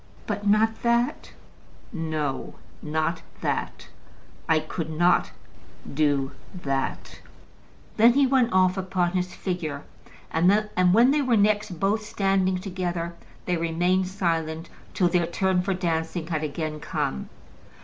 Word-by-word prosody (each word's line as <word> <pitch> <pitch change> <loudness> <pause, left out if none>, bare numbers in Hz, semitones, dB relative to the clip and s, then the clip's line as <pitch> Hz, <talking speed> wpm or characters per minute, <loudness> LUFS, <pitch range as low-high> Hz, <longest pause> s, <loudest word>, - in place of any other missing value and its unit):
"But 205 0 -3
not 220 +2 +3
that?" 240 +4 0 0.6
"No; 155 -6 -3 0.3
not 155 +2 -1 0.2
that. - - -3 0.6
I 160 - +5
could 155 +1 -5
not 175 +3 +3 0.6
do 140 -2 +1 0.2
that." 135 -6 -3 0.8
Then 235 +2 +7
he 280 +1 +4
went 255 -2 +3
off 185 0 +3
upon 185 -2 0
his 180 0 -2
figure, 160 -6 -3 0.5
and 175 +5 +4 0.4
when 235 +7 +6
they 295 +1 +2
were 250 -4 +2
next 205 -3 +1
both 210 +3 +1
standing 195 -2 +1
together, 180 -3 -3 0.3
they 180 -1 0
remained 175 +3 +1
silent 165 -4 -2 0.2
till 180 - +3
their 175 -1 +1
turn 185 +1 +1
for 190 +1 -1
dancing 165 -2 -2
had 160 -2 -2
again 155 0 -3
come. 65 - -3
180 Hz, 125 wpm, -25 LUFS, 160-195 Hz, 0.8 s, Then